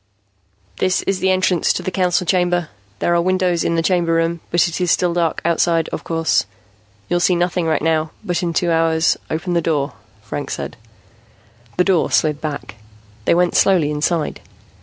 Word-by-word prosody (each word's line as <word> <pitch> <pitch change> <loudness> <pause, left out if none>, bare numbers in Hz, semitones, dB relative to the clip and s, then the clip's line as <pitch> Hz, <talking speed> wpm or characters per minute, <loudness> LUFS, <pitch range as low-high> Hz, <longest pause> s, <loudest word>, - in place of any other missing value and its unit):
"This 185 -1 +1
is 195 -1 -1
the 190 - +1
entrance 185 -2 +2
to - - -4
the 185 - -3
Council 180 0 +1
Chamber. 175 -3 +1 0.3
There 175 - 0
are 170 - +3
windows 185 -1 +1
in 170 - 0
the 165 - +1
Chamber 175 -2 +1
Room, 165 +1 0
but 175 0 +3
it 170 +2 -4
is 180 - +1
still 175 0 +2
dark 170 -2 0
outside, 165 -1 +1
of - - -5
course. 165 -9 0 0.6
You'll 175 - +1
see 180 +1 +3
nothing 175 -1 0
right 155 -2 0
now, 160 -1 +1
but 175 0 -1
in 175 -2 -1
two 170 +1 0
hours 165 0 +2
" - - -33
"Open 165 +3 -2
the 170 - +2
door," 145 -4 -1 0.3
Franks - - -4
said. - - -6 1.0
The 180 - +4
door 185 -3 +2
slid 150 -2 +1
back. 145 -7 -5 0.5
They - - +3
went 175 0 +2
slowly 170 -6 +3
inside. 150 +1 -1
170 Hz, 185 wpm, -19 LUFS, 165-180 Hz, 1.0 s, The